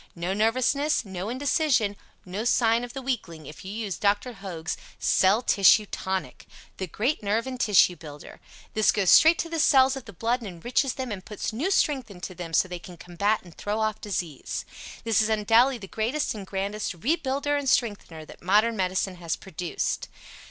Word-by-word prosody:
No 175 +2 -2
nervousness, 255 +7 +1
no 190 +1 -5
indecision, 260 -4 +1 0.3
no 190 +4 -4
signs 235 0 +2
of 240 - -11
the 270 - -6
weakling 175 - -4
if 150 - -11
you 190 - -7
use 210 -4 -4
Dr. 205 +4 +1
Hoag's 185 -6 -5 0.2
CELL 200 +6 +3
TISSUE 210 0 +5
TONIC 190 -1 -4 0.3
The 190 - -4
great 240 - -1
nerve 215 +3 0
and 260 -1 -6
tissue 195 -5 +4
builder. 150 -3 -11 0.3
This 215 -2 +4
goes 195 -4 +2
straight 320 +2 +7
to - - -2
the 330 -1 -3
cells 270 -3 +5
of 270 - -8
the 205 - -10
blood 230 +7 0
and 220 - -6
enriches 240 - -1
them 260 -3 -4
and 190 -3 -5
puts 210 +1 -5
new 285 - -1
strength 285 - +1
into 185 -1 -8
them 170 -2 -7
so 185 - +3
they 180 -1 -6
can 175 0 -12
combat 200 +6 -1
and 175 -2 -15
throw 210 +1 -3
off 215 -2 -1
disease. 170 -8 -4 0.4
This 225 -1 +3
is 215 - +1
undoubtedly 225 +4 +3
the 200 -4 -10
greatest 235 +10 -1
and 200 -3 -8
grandest 200 +1 -3
REBUILDER 280 - 0
AND 285 -2 0
STRENGTHENER 200 -11 -1
that - - -14
modern 210 +6 +3
medicine 185 -1 -1
has 170 -2 -2
produced. 180 -2 -4
210 Hz, 185 wpm, -26 LUFS, 185-245 Hz, 0.4 s, straight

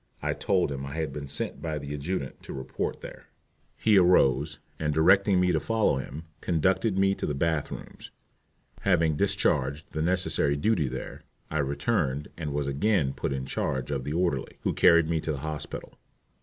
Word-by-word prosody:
I - - +1
told 95 -6 +1
him 70 -1 -4
I 70 +2 -6
had 80 -4 -2
been 70 0 -6
sent 70 - -3
by 80 -1 -2
the 70 0 -5
adjutant 75 -1 -4
to - - -8
report 65 -1 -4
there. - - -10 0.5
He 105 -3 +5
arose, 75 -5 +3 0.2
and 75 -1 0
directing 95 +5 +4
me 90 0 +3
to 80 - +2
follow 110 -3 +1
him, 65 +4 -6 0.2
conducted 95 +5 +1
me 95 0 +4
to - - -3
the 75 - -1
bath 80 +1 0
rooms. - - -9 0.7
Having 85 -6 +2
discharged 70 +8 0
the 80 - -3
necessary 85 -4 +2
duty 85 -2 +1
there, 65 +1 -6 0.3
I 80 - 0
returned 70 - 0
and 75 -3 -4
was 70 0 -1
again 70 +1 +1
put - - -3
in 65 -1 -3
charge 65 +1 -2
of 70 -3 -2
the 75 - -3
orderly, 85 -6 -1
who - - 0
carried 85 -1 +5
me 80 -1 0
to 80 - -2
the - - -4
hospital. 75 -1 -6
75 Hz, 185 wpm, -27 LUFS, 70-90 Hz, 0.7 s, He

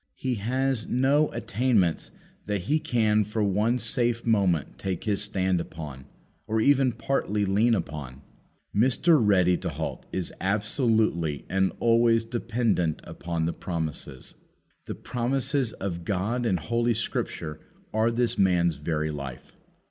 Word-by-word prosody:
He 130 -1 -2
has 130 +1 0
no 140 +4 +3
attainments 115 -5 +1 0.4
that 105 -2 -1
he 150 - +1
can 110 -5 +2
for 105 +1 -2
one 105 +5 +2
safe 120 -1 0
moment 95 -9 +1
take 95 -3 -3
his 105 -2 0
stand 95 -4 0
upon, 75 -6 -8 0.4
or 110 +1 0
even 135 +1 +4
partly 110 -3 -1
lean 110 +5 +3
upon. 70 - -5 0.5
Mr. 130 +8 +4
Ready 90 -4 +4
to - - -4
halt - - -5
is 95 -2 -2
absolutely 105 - +1
and 95 0 +2
always 115 0 +4
dependent 115 -8 0
upon 85 -1 -3
the 85 - -1
promises. 80 -6 -4 0.5
The - - -4
promises 130 +1 -1
of 85 -3 -4
God 105 +7 -1
in 95 -5 +2
Holy 115 +7 0
Scripture 80 -7 -3 0.3
are 110 +1 +3
this 120 0 0
man's 85 -4 +3
very 75 +1 -2
life. 70 -4 -8
105 Hz, 135 wpm, -26 LUFS, 85-120 Hz, 0.5 s, even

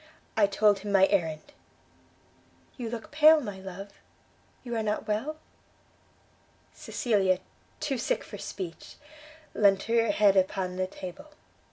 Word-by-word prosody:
I 210 -2 +4
told 205 0 +3
him 205 +1 -5
my 195 -1 +6
errand. 165 - -1 1.2
You 240 -3 -5
look 225 -1 -7
pale, 310 +1 +7
my 205 -8 -6
love? 190 +1 -8 0.7
You 240 -2 -4
are 225 - 0
not 210 -1 -2
well? 225 +9 -2 0.7
" - - -35
Cecilia, 195 -6 +1 0.4
too 280 -5 -2
sick - - -1
for - - -10
speech, 170 -4 -7 0.6
leant 195 -2 +3
her 230 0 +2
head 205 -1 +4
upon 185 -1 0
a 185 - 0
table. 185 - -9
205 Hz, 135 wpm, -28 LUFS, 190-235 Hz, 1.2 s, pale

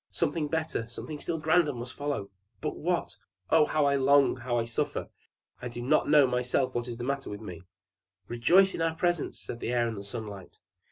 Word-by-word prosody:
Something 155 -3 -1
better, 160 -7 -2
something 150 +5 -7
still 165 +2 -2
grander 155 -1 +3
must 120 +1 -7
follow 145 -9 -3 0.3
but - - -3
what? 175 +2 -2 0.3
Oh, 160 -1 +6
how 155 -2 +2
I 140 0 +3
long, 140 0 +4
how 120 -1 -2
I 115 - +1
suffer! 115 - -2 0.5
I 125 - -4
do 120 0 -7
not 135 +6 +2
know 150 -2 +7
myself 125 +1 0
what 120 0 -2
is 120 -1 -5
the 120 - -5
matter 140 +1 -2
with 105 - -6
me!" 90 -6 -8 0.7
"Rejoice 180 +12 +4
in - - -4
our 165 0 +1
presence!" 175 -1 -1
said 120 - -7
the 120 - -3
Air 120 -1 +2
and 115 - -3
the - - -7
Sunlight. 100 -2 -8
130 Hz, 205 wpm, -29 LUFS, 120-155 Hz, 0.7 s, know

